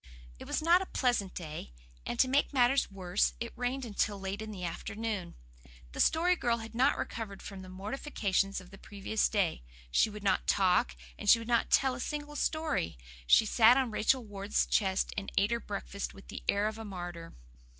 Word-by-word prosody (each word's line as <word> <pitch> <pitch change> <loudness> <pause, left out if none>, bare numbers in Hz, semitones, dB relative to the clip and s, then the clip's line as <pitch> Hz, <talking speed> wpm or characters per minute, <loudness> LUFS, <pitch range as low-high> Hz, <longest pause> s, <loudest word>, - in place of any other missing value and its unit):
It - - -8
was - - -1
not 345 +3 +5
a 385 - -4
pleasant 240 -7 0
day, 150 - -7 0.3
and 240 - -3
to 260 - +5
make 280 +3 +2
matters 260 +2 +3
worse 190 -1 0
it 235 0 -5
rained 250 +2 -2
until 205 -2 -1
late 195 +2 -4
in 220 - -6
the 195 -4 -7
afternoon. 200 +2 -4 0.6
The - - -8
Story 350 +3 +4
Girl 240 -8 0
had 225 0 -8
not 260 +5 +3
recovered 210 -4 -5
from 195 -2 -8
the 185 - -10
mortifications 195 -1 -1
of 185 -1 -14
the 195 - -13
previous 205 +1 -1
day; 195 - 0 0.3
she 220 - +4
would 210 -1 -9
not 200 - +1
talk, 180 - +3 0.2
and - - -1
she - - +9
would 230 0 -7
not 235 -1 +2
tell 265 -1 +4
a 250 - -6
single 295 +2 -4
story; 310 - -1 0.3
she 220 - +6
sat 230 +3 +6
on 260 -4 +1
Rachel 235 +3 +1
Ward's 200 0 -1
chest 190 -2 +1
and 200 -1 -4
ate 200 +3 +3
her 235 - +1
breakfast 200 -2 -5
with 195 - -15
the - - -7
air 200 +1 +3
of 220 +1 -5
a - - -5
martyr. 175 -4 -7
215 Hz, 200 wpm, -31 LUFS, 195-245 Hz, 0.6 s, she